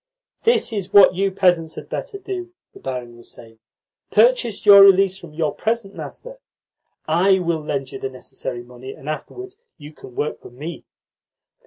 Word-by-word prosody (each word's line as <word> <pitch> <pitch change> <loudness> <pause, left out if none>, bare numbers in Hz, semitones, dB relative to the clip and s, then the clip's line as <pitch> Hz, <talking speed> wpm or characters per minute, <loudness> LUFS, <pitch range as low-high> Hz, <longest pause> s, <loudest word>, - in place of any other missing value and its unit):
"This 460 - +2
is 195 -3 -4
what 200 -2 +7
you 195 +2 0
peasants 175 -4 +1
had - - -9
better 400 - -5
do," 365 -2 -7 0.2
the - - -14
barin 125 -2 -6
was 120 - -13
saying. 115 -1 -14 0.5
"Purchase 480 - +2
your 200 -1 +10
release 195 -1 +6
from 175 -4 -12
your 155 -2 -1
present 220 -3 -2
master. - - -9 0.7
I 185 +5 +3
will 170 -3 -1
lend 135 -3 -3
you - - -7
the 135 - -4
necessary 130 -1 -7
money, 125 +2 -10
and 135 - -14
afterwards 375 - -7 0.2
you 150 -1 -12
can 125 -4 -14
work 150 - -3
for - - -12
me." 145 +8 -8
175 Hz, 170 wpm, -21 LUFS, 135-205 Hz, 0.7 s, your